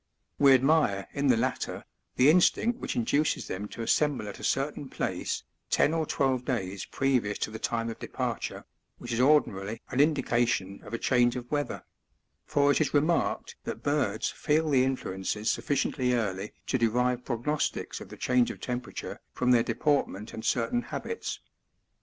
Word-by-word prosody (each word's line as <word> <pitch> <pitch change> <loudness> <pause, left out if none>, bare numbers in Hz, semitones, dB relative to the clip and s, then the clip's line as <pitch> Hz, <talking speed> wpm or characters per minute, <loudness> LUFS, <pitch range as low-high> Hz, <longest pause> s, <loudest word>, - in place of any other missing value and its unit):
We 140 -1 +7
admire 130 -8 +2
in 140 0 0
the 125 -3 +5
latter 130 +3 -2 0.3
the 135 +4 +6
instinct 225 +7 +3
which - - -3
induces 155 - +1
them 100 +3 -4
to 115 - -6
assemble 140 -2 +1
at 100 - -7
a - - -10
cer - - +1
tain - - -9
place, - - -2 0.3
ten 155 - +3
or 160 -2 0
twelve 130 -2 +1
days 100 -7 -3
previous 125 -7 0
to - - -3
the 110 - -6
time 115 0 -1
of 115 - -6
departure, - - -4 0.3
which 120 -1 -6
is 115 - -1
ordinarily 115 -7 +2
an 125 - -1
indication 120 -9 +1
of 105 +3 -5
a - - -1
change 120 0 +3
of 125 -1 -6
weather; 145 -1 -2 0.6
for 145 0 +3
it 145 - +2
is 150 - 0
remarked 155 +4 +1
that - - -5
birds 140 -8 0
feel 155 +1 +1
the 130 -2 +5
influences 105 -4 -1
sufficiently 130 -3 0
early 100 -3 -2
to 130 - 0
derive 125 +2 +1
^prognostics 135 +5 -2
of - - -10
the - - -10
change 125 -1 +2
of - - -7
temperature 125 -1 -5
from 125 0 +1
their 120 -2 +6
deportment 115 -4 0
and 110 - -6
certain 120 - +1
habits. 455 - -5
125 Hz, 170 wpm, -28 LUFS, 115-145 Hz, 0.6 s, We